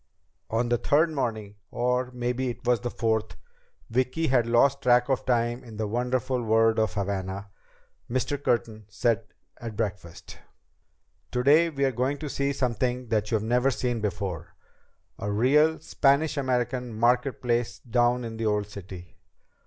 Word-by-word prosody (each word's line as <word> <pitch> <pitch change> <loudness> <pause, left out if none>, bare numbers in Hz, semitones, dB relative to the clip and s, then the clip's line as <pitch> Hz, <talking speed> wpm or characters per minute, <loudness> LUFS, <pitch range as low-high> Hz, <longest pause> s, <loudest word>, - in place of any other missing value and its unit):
On 115 +2 0
the 120 -1 +2
third 160 +3 +3
morning 110 -8 -3
or 125 +1 0
maybe 125 +1 -2
it 120 +1 -7
was 120 -1 +3
the 120 - -3
fourth, 110 -2 -1 0.5
Vicki 130 +7 0
had 125 -5 +2
lost 130 +4 +3
track 125 +1 +4
of 135 - 0
time 120 0 +1
in 115 -3 -11
the 110 - -1
wonderful 125 +3 -1
world 115 0 +3
of 110 0 0
Havana 100 0 -3 0.6
Mr. 135 +3 -2
Curtin 110 -3 -1
said 115 +2 0 0.3
at 115 -2 -7
breakfast: 100 -6 -5 0.9
"Today 145 +7 +4
we're 140 -3 0
going 130 +4 -1
to 150 0 -6
see 140 +1 -1
something 125 -1 -1
that 105 -2 0
you've 110 -2 0
never 125 +4 +2
seen 120 -3 -2
before, 95 -5 -4 0.6
a 105 - -3
real 150 +9 +3
Spanish 145 0 +2
American 125 -3 -1
market 125 +3 +2
place 120 -1 -1
down 120 +1 +1
in 115 -1 -6
the 115 - -2
Old 105 -1 +1
City." 95 -4 -11
120 Hz, 150 wpm, -26 LUFS, 110-130 Hz, 0.9 s, track